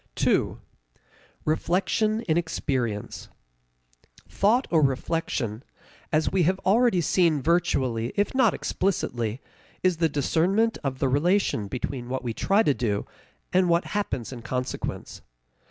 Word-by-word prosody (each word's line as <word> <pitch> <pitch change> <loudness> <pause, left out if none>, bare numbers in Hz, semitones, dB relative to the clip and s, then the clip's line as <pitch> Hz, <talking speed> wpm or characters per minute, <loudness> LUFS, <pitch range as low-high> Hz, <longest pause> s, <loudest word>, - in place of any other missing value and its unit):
2. - - +1 0.9
Reflection 195 +7 +1
in 160 -8 0
Experience. 130 -10 -2 1.0
Thought 230 +6 +2
or 165 -2 +4
reflection, 135 -5 -1 0.5
as 155 0 +1
we 190 - +2
have 185 +3 +2
already 220 -2 +4
seen 165 -1 +2
virtually 130 -7 +1
if 205 - 0
not 265 0 +3
explicitly, 120 - -2 0.4
is 185 -3 +2
the 165 -1 +2
discernment 180 - +1
of 135 -2 -2
the 135 - +1
relation 145 - +1
between 125 +2 -4
what 130 +1 -3
we 120 -2 -2
try 200 - +2
to 145 - +3
do 105 -6 -1 0.5
and 180 -1 +3
what 170 +1 +2
happens 135 - -2
in 120 - -8
consequence. 125 +2 -4
160 Hz, 125 wpm, -26 LUFS, 125-190 Hz, 1.0 s, or